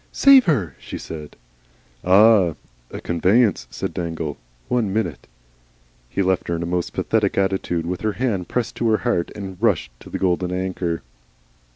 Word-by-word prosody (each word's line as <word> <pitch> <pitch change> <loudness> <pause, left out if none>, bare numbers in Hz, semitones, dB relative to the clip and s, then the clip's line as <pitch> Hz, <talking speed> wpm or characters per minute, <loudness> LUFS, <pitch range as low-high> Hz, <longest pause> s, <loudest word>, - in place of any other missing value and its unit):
"SAVE 275 -2 +7
HER!" 105 - 0
she - - -7
said. 75 -2 -8 0.7
"Ah! 95 -3 +5 0.3
A - - -7
conveyance," 95 - +2
said - - -4
Dangle. 80 -3 -3 0.3
"One 115 -5 0
minute." 90 - -2 0.8
He 100 - 0
left 95 -1 0
her 85 - -1
in 85 - -3
a - - -2
most 90 0 -2
pathetic 105 -3 0
attitude, 95 -3 0
with 90 +1 -3
her 110 -1 0
hand 105 -8 -1
pressed 120 -2 -2
to 115 - +1
her 110 - +4
heart, 90 -8 +1
and 95 -2 -7
rushed 110 -7 +1
into - - -13
the - - -3
Golden 90 -1 0
Anchor. 90 -2 -2
95 Hz, 165 wpm, -22 LUFS, 85-110 Hz, 0.8 s, SAVE